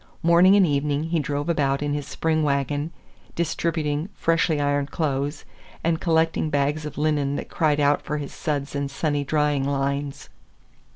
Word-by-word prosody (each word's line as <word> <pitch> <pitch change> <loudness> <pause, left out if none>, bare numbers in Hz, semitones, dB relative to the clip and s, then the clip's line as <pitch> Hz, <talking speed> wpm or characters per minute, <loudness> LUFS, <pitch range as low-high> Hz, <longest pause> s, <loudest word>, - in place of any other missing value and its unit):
Morning 170 +3 +6
and 200 -2 +6
evening 145 -1 0
he 165 -1 +1
drove 145 0 -2
about 145 -4 +1
in 145 0 -1
his 145 -2 -3
spring 160 -1 0
wagon, 145 +1 0 0.5
distributing 160 -1 -1
freshly 165 -2 +1
ironed 145 0 0
clothes, 145 -1 -2 0.4
and 165 0 0
collecting 160 -2 +1
bags 145 +1 0
of 150 - -9
linen 145 -2 +1
that - - -5
cried 150 -3 +1
out 145 0 +3
for 150 - -3
his 145 -2 -6
suds 145 -3 -3
and 140 -1 -2
sunny 145 +1 -1
drying 150 -1 +1
lines. 140 0 -2
145 Hz, 160 wpm, -24 LUFS, 140-160 Hz, 0.5 s, Morning